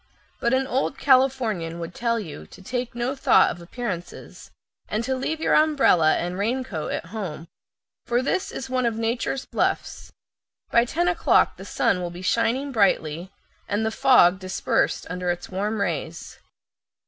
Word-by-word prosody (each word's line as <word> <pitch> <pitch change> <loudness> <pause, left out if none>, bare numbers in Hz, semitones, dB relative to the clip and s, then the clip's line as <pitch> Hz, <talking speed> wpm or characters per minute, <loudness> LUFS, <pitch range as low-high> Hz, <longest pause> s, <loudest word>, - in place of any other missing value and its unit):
But 235 +2 +2
an 265 +1 +1
old 265 +1 -1
Californian 255 -11 +2
would 170 0 -6
tell 230 -1 0
you 150 - -8
to - - -15
take 245 +2 -4
no 240 +3 -2
thought 270 - +4
of 175 - -9
appearances, 180 -2 -7 0.4
and 215 +2 -2
to 265 +2 -1
leave 305 +5 -2
your - - +1
umbrella 275 - +4
and 175 +2 -3
raincoat 225 -6 -2
at - - -3
home, 170 -7 -5 0.6
for 240 +1 +1
this 370 +7 -1
is 265 - -6
one 255 -2 0
of 230 - -1
nature's 235 +4 -2
"bluffs"; - - -2 0.6
by 235 0 +4
ten 340 +8 0
o'clock 350 -1 +3
the - - -9
sun 180 - +1
will 175 - -3
be 175 +2 -9
shining 240 +7 +1
brightly, 180 - +1 0.4
and 210 +2 0
the 220 - 0
fog 220 -8 +5
dispersed 185 -1 -1
under 180 0 -3
its 175 0 -3
warm 205 +3 -2
rays. 200 - -4
225 Hz, 160 wpm, -24 LUFS, 180-260 Hz, 0.6 s, fog